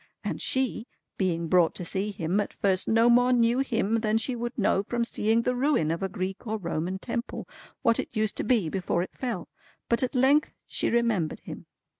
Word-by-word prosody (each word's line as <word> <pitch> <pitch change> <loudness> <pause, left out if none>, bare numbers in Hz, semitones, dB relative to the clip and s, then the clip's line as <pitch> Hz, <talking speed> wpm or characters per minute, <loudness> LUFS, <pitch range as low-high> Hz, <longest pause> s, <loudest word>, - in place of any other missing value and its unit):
And - - -3
she, 260 -2 -1 0.3
being 170 -3 0
brought 175 -1 +3
to 180 - -5
see 195 +4 -1
him, 190 -1 -1
at 205 - -2
first 190 -2 +1
no 230 +1 +4
more 245 +1 +5
knew 240 0 +3
him 230 -5 +1
than 220 -1 +1
she 245 +3 -1
would 240 +1 -4
know 200 -3 +2
from 235 +3 -2
seeing 225 0 +1
the 250 - +1
ruin 250 - +1
of 165 - -2
a 195 - -1
Greek 190 +4 -5
or 220 +1 -1
Roman 175 -1 -3
Temple, 235 +3 -5 0.4
what 230 -1 +3
it - - -5
used 215 -1 0
to - - 0
be 220 -7 +2
before 175 0 -1
it - - -10
fell; 235 -9 -4 0.4
but 235 +3 +2
at 255 +1 -1
length 270 +4 +3
she - - -1
remembered 230 -9 0
him. - - -9
220 Hz, 205 wpm, -27 LUFS, 190-240 Hz, 0.4 s, more